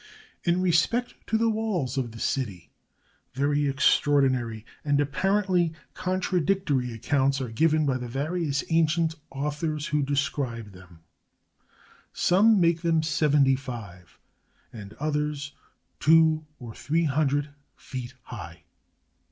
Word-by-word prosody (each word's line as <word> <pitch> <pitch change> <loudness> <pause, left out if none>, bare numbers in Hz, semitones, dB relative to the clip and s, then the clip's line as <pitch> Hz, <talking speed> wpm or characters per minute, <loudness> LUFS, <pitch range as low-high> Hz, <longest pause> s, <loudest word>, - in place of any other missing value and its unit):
513 170 -1 +3
MESOPOTAMIA 180 +7 +2
In - - -21
respect - - -34
to 220 - +1
the 230 +1 +2
walls 200 - -2
of 125 -4 -2
the 115 - -10
city, 105 -12 -3 0.6
very 145 +1 +1
extraordinary 130 -5 +2 0.2
and 145 -1 +1
apparently 180 +3 +1 0.2
contradictory 185 -7 0
accounts 135 +4 +1
are 130 -3 -3
given 155 +5 +2
by 130 -2 0
the 125 - -5
various 145 +3 -2
ancient 165 0 +2 0.2
authors 150 +2 -3
who 150 0 0
described 135 -6 -2
them. 90 -3 -16 1.1
Some 205 +4 +4
make 170 -1 +2
them 165 -2 +2
seventy 150 -3 +3
five, 110 -10 -9 0.6
and 105 -3 -9
others 150 -1 -2 0.5
two 160 0 +4
or 120 -3 -8
three 165 +8 0
hun 150 0 +2
dred 145 +2 -1 0.3
feet 130 -1 -8
high. - - -9
145 Hz, 125 wpm, -26 LUFS, 130-165 Hz, 1.1 s, Some